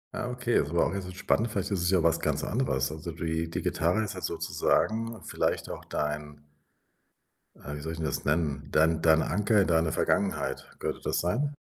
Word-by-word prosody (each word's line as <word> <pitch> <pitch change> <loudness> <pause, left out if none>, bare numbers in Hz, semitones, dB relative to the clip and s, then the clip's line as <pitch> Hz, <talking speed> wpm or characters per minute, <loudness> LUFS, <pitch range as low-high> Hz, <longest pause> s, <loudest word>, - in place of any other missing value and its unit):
Ah, 125 - -2
okay, 125 -1 +1
ist 70 - -4
aber 85 +2 +2
auch - - +1
'n - - -5
bisschen 90 -2 -5
spannend. 115 +4 +1
Vielleicht 100 -1 -2
ist 95 -3 0
es 90 - +1
ja 90 -3 +3
was 85 0 +3
ganz - - -1
anderes. 75 - 0
Also, 80 +2 -6
die 80 0 -2
die 85 +1 -3
Gitarre 90 +7 +1
ist 105 -1 -4
halt 95 - -7
sozusagen 115 +1 0
vielleicht - - -1
auch - - -7
dein 75 0 -3 1.2
äh, 75 - -5
wie 75 - -6
soll 80 +2 -4
ich 80 - -7
'n - - -2
das 75 - -2
nennen? 75 -2 0
Dein 80 +1 +3
deine 80 -1 +5
Anker 105 +2 +3
in 95 - +2
deine 80 -1 +2
Vergangenheit. 100 +4 0
Könnte - - -3
das - - 0
sein? 140 +12 0
85 Hz, 210 wpm, -28 LUFS, 80-100 Hz, 1.2 s, deine